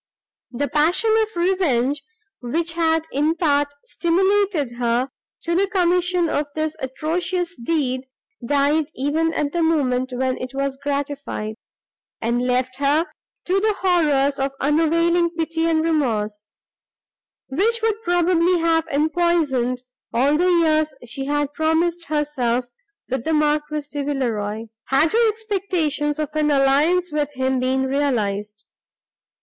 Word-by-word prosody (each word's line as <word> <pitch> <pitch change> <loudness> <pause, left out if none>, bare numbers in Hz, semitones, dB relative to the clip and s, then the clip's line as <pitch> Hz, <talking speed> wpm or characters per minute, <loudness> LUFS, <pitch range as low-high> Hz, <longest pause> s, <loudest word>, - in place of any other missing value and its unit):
The 285 +3 -2
passion 335 +10 +2
of 435 - +1
revenge, 300 -7 +1 0.4
which 325 +7 -2
had 325 -1 +1
in 300 +4 +1
part 290 -4 +2 0.2
stimulated 370 - +1
her 245 +2 0 0.3
to 340 - -1
the 385 +3 +2
commission 360 -1 +1
of 295 -1 -1
this 310 0 -1
atrocious 340 +6 -2
deed, 260 -1 -2 0.4
died, 290 +4 +1
even 305 +5 0
at 290 -1 0
the 345 - -1
moment 260 -6 +1
when 255 +1 -1
it 255 +1 -6
was 275 0 -2
gratified, 280 -6 -3 0.7
and 235 +2 0
left 255 +1 0
her 285 +4 +2 0.4
to 375 +2 +2
the 425 +1 +1
horrors 295 -7 +2
of 270 0 -1
unavailing 335 +4 +2
pity 325 0 0
and 320 -1 +2
remorse, 215 -10 -1 1.0
which 440 +11 +1
would 445 -1 0
probably 350 -1 +2
have 325 -1 +1
empoisoned 300 -5 +1 0.3
all 275 +5 +2
the 355 +4 +2
years 310 -3 +2
she 270 +4 -5
had 290 0 -1
promised 330 +2 0
herself 275 -5 -1 0.4
with 260 -2 -2
the 320 - 0
Marquis 300 0 0
de 290 -1 -3
Villeroi, 225 -7 -2 0.2
had 280 +4 +3
her 460 0 +4
expectations 370 -9 -1
of 305 -2 -2
an 305 -1 +1
alliance 295 +6 +3
with 295 -1 -1
him 260 0 0
been 260 +1 +1
realised. 215 -7 -1
300 Hz, 130 wpm, -21 LUFS, 265-340 Hz, 1.0 s, her